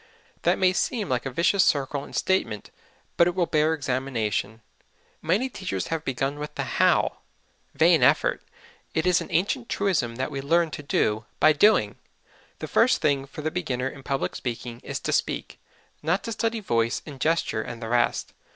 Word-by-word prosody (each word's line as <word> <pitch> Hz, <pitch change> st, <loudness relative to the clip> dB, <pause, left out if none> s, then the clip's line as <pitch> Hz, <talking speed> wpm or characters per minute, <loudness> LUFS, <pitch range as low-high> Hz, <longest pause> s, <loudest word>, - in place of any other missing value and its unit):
That -, -, +2 dB
may 185 Hz, -1 st, +3 dB
seem 210 Hz, +1 st, -1 dB
like 125 Hz, +1 st, -1 dB
a -, -, -2 dB
vicious 170 Hz, +8 st, +3 dB
circle 140 Hz, -3 st, +1 dB
in -, -, -12 dB
statement, 190 Hz, -, -1 dB, 0.5 s
but 170 Hz, -, +6 dB
it 175 Hz, -, -1 dB
will 180 Hz, -2 st, +2 dB
bear 155 Hz, 0 st, +2 dB
examination. 125 Hz, -6 st, -2 dB, 0.6 s
Many 190 Hz, +11 st, +1 dB
teachers 190 Hz, -, -4 dB
have 160 Hz, -1 st, -2 dB
begun 135 Hz, +2 st, -2 dB
with 150 Hz, 0 st, -6 dB
the -, -, -2 dB
how. -, -, +2 dB, 0.6 s
Vain -, -, +5 dB
effort! -, -, +3 dB, 0.5 s
It 160 Hz, -, +1 dB
is 180 Hz, -1 st, +3 dB
an -, -, -6 dB
ancient 205 Hz, +8 st, 0 dB
truism 165 Hz, -13 st, 0 dB
that 130 Hz, -, -3 dB
we 135 Hz, -, -4 dB
learn 165 Hz, +3 st, +2 dB
to 145 Hz, -, -6 dB
do 110 Hz, -6 st, 0 dB
by 155 Hz, -, +6 dB
doing. 210 Hz, +9 st, +3 dB, 0.6 s
The -, -, -6 dB
first 245 Hz, +3 st, +3 dB
thing 140 Hz, -3 st, +1 dB
for 150 Hz, +2 st, -9 dB
the 155 Hz, -, -1 dB
beginner 135 Hz, -7 st, -2 dB
in 140 Hz, -, -11 dB
public 135 Hz, 0 st, -2 dB
speaking 120 Hz, -1 st, -5 dB
is -, -, -5 dB
to -, -, -2 dB
speak -, -, -2 dB, 0.4 s
not 165 Hz, +6 st, 0 dB
to 230 Hz, -, -4 dB
study 225 Hz, 0 st, -1 dB
voice 115 Hz, -, 0 dB
and 140 Hz, -4 st, -10 dB
gesture 160 Hz, -8 st, +1 dB
and 115 Hz, +1 st, -7 dB
the 115 Hz, -1 st, -6 dB
rest. 120 Hz, 0 st, +1 dB
150 Hz, 180 wpm, -25 LUFS, 125-180 Hz, 0.6 s, but